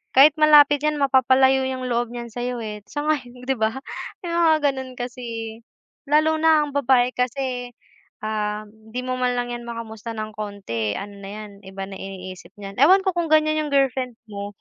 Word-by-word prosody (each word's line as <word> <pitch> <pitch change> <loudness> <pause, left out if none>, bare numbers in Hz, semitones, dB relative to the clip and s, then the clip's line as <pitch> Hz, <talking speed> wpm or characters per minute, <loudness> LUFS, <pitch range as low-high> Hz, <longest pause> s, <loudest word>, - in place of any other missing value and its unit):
kahit 285 +3 +8
malapit 295 -1 +6
'yan, 300 -1 +1
mapapalayo 265 0 +4
'yong 255 -1 -3
loob 240 -1 -1
niyan 235 -1 -6
sa'yo, 245 +1 -3
eh, 210 -1 -5
sang-ayon, 285 -5 -3
'di 270 - +2
ba? 220 +1 +1 0.5
May 345 - -4
mga 325 -2 +5
gano'n 265 -1 -7
kasi, 230 -2 -5 0.5
lalo 310 +2 +3
na 315 -1 +5
ang - - -8
babae, 255 -3 +3
kasi, 250 0 -2 0.5
um, 215 -1 -2 0.2
hindi 250 - -3
mo 255 - -1
man 250 -1 +1
lang 245 0 -3
'yan 240 - -8
makamusta 230 -1 -6
ng 215 0 -5
kaunti, 190 - -3
ano 205 0 -8
na 195 - -8
'yan, 215 0 -8
iba 190 0 -7
na 195 - -8
iniisip 185 -2 -8
niyan. 195 -1 -8
Ewan 380 +6 +7
ko, 375 - +2
kung 335 -2 -1
ganiyan 310 0 +3
'yong - - -7
girlfriend 260 -3 +1
mo, 205 -1 -6
245 Hz, 180 wpm, -23 LUFS, 215-280 Hz, 0.5 s, kahit